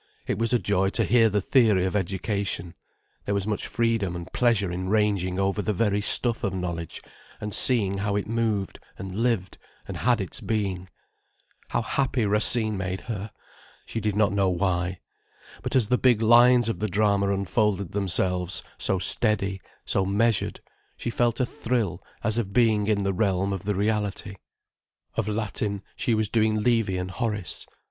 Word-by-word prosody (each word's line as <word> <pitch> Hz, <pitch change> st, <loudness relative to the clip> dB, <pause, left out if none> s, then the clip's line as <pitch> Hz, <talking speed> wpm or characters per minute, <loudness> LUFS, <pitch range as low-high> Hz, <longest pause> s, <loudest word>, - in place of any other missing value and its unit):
It -, -, -2 dB
was 115 Hz, 0 st, +1 dB
a 125 Hz, -, +4 dB
joy 95 Hz, -4 st, +1 dB
to -, -, +2 dB
hear 115 Hz, -2 st, +4 dB
the 105 Hz, 0 st, 0 dB
theory 105 Hz, -5 st, +3 dB
of 95 Hz, -, -2 dB
education, 95 Hz, -2 st, -2 dB, 0.5 s
there 100 Hz, -, -1 dB
was 100 Hz, -, 0 dB
such 105 Hz, +1 st, -2 dB
freedom 115 Hz, -6 st, 0 dB
and 85 Hz, +1 st, -8 dB
pleasure 115 Hz, -7 st, +2 dB
in 95 Hz, +1 st, -3 dB
ranging 100 Hz, -4 st, +1 dB
over 95 Hz, +1 st, 0 dB
the 105 Hz, -, -1 dB
very 105 Hz, 0 st, +1 dB
stuff 120 Hz, +3 st, 0 dB
of 100 Hz, -3 st, -1 dB
knowledge, 85 Hz, -3 st, -4 dB, 0.4 s
and 105 Hz, -1 st, -5 dB
seeing 100 Hz, -6 st, +2 dB
how 100 Hz, 0 st, -1 dB
it 100 Hz, -, -1 dB
moved 110 Hz, -3 st, -1 dB, 0.2 s
and 95 Hz, -1 st, -7 dB
lived 110 Hz, -3 st, -1 dB, 0.3 s
and -, -, -5 dB
had 120 Hz, -1 st, +2 dB
its 95 Hz, -, -3 dB
being. 95 Hz, -4 st, -2 dB, 0.8 s
How 120 Hz, -, 0 dB
happy 130 Hz, -2 st, 0 dB
Racine 110 Hz, +1 st, +2 dB
made 95 Hz, 0 st, -3 dB
her! 110 Hz, -3 st, -5 dB, 0.6 s
She 115 Hz, -, -4 dB
did 105 Hz, -1 st, -1 dB
not 105 Hz, -2 st, +2 dB
know 100 Hz, -2 st, +2 dB
why. 90 Hz, 0 st, -1 dB, 0.6 s
But -, -, -3 dB
as 120 Hz, -5 st, +3 dB
the 125 Hz, -, +2 dB
big 120 Hz, -4 st, +3 dB
lines 120 Hz, +1 st, +6 dB
of 115 Hz, -, -2 dB
the 110 Hz, -, 0 dB
drama 100 Hz, 0 st, +2 dB
unfolded 100 Hz, -1 st, 0 dB
themselves, 90 Hz, -2 st, 0 dB, 0.2 s
so 95 Hz, -, +1 dB
steady, 100 Hz, -1 st, +2 dB, 0.2 s
so 95 Hz, -, +1 dB
measured, 105 Hz, +3 st, 0 dB, 0.4 s
she 120 Hz, -, -3 dB
felt 120 Hz, 0 st, +1 dB
a 125 Hz, -, +2 dB
thrill 115 Hz, -, -2 dB, 0.2 s
as 115 Hz, 0 st, +2 dB
of 100 Hz, -4 st, -3 dB
being 110 Hz, -3 st, +3 dB
in 105 Hz, -2 st, +1 dB
the 95 Hz, 0 st, 0 dB
realm 95 Hz, 0 st, 0 dB
of 95 Hz, -2 st, -5 dB
the 105 Hz, -1 st, 0 dB
reality. 100 Hz, -1 st, -1 dB, 0.8 s
Of -, -, -2 dB
Latin, 105 Hz, -1 st, -2 dB
she 115 Hz, -, 0 dB
was 110 Hz, -1 st, +1 dB
doing 110 Hz, 0 st, +2 dB
Livy 110 Hz, -4 st, +1 dB
and 90 Hz, 0 st, -4 dB
Horace. 105 Hz, -3 st, -3 dB
105 Hz, 170 wpm, -25 LUFS, 95-115 Hz, 0.8 s, lines